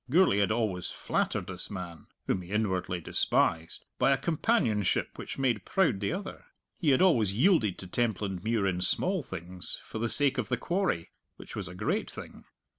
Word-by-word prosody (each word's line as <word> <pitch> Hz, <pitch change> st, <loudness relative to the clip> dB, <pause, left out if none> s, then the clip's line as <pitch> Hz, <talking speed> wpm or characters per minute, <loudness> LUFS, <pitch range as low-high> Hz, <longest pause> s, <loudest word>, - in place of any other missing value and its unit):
Gourlay 165 Hz, -, +4 dB
had 100 Hz, +1 st, +2 dB
always 105 Hz, -6 st, -1 dB
flattered -, -, -2 dB
this -, -, -5 dB
man 90 Hz, -5 st, -7 dB, 0.2 s
(whom 95 Hz, -, 0 dB
he 90 Hz, -, -12 dB
inwardly 95 Hz, -4 st, -1 dB
despised) 80 Hz, 0 st, 0 dB
by 125 Hz, -, +4 dB
a 135 Hz, -, +4 dB
companionship 135 Hz, -, +1 dB
which -, -, -7 dB
made 120 Hz, -7 st, 0 dB
proud 165 Hz, -, +1 dB
the 100 Hz, -, -1 dB
other. 195 Hz, +3 st, -6 dB, 0.3 s
He 165 Hz, -, +1 dB
had 135 Hz, +5 st, +4 dB
always 115 Hz, -, +3 dB
yielded 125 Hz, -, +3 dB
to -, -, -7 dB
Templandmuir 105 Hz, -1 st, -1 dB
in 90 Hz, -2 st, 0 dB
small 185 Hz, -, +1 dB
things, 90 Hz, -, -6 dB
for 110 Hz, -, -7 dB
the 115 Hz, +1 st, -1 dB
sake 140 Hz, 0 st, +7 dB
of -, -, -3 dB
the 125 Hz, -, 0 dB
quarry, 175 Hz, -, -1 dB, 0.2 s
which -, -, -11 dB
was -, -, -4 dB
a 90 Hz, -, -9 dB
great -, -, -1 dB
thing. -, -, -10 dB
110 Hz, 180 wpm, -29 LUFS, 95-135 Hz, 0.3 s, sake